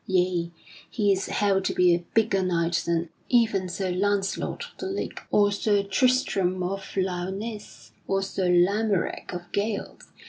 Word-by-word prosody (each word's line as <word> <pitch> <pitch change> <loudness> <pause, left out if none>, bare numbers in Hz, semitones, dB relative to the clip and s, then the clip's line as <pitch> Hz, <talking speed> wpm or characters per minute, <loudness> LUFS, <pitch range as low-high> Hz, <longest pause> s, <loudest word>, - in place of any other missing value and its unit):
Yea; 180 -2 +1 0.4
he 205 -4 +1
is 190 - -2
held 195 -2 +1
to - - -1
be 180 -1 +5
a 175 0 0
bigger 220 -3 +3
knight 170 -2 +1
than 170 0 0 0.2
even 220 -6 +2
Sir 185 +1 -2
Launcelot 195 +1 -1
of - - -29
the - - -3
Lake 385 +1 -4
or 205 -1 +4
Sir 205 0 +1
Tristram 195 -4 +1
of 195 +2 -5
Lyonesse 190 +4 -4 0.2
or 195 0 +1
Sir 190 -1 -1
Lamorack 195 +2 +1
of 180 -1 -5
Gales. 205 0 -3
195 Hz, 150 wpm, -26 LUFS, 180-205 Hz, 0.4 s, be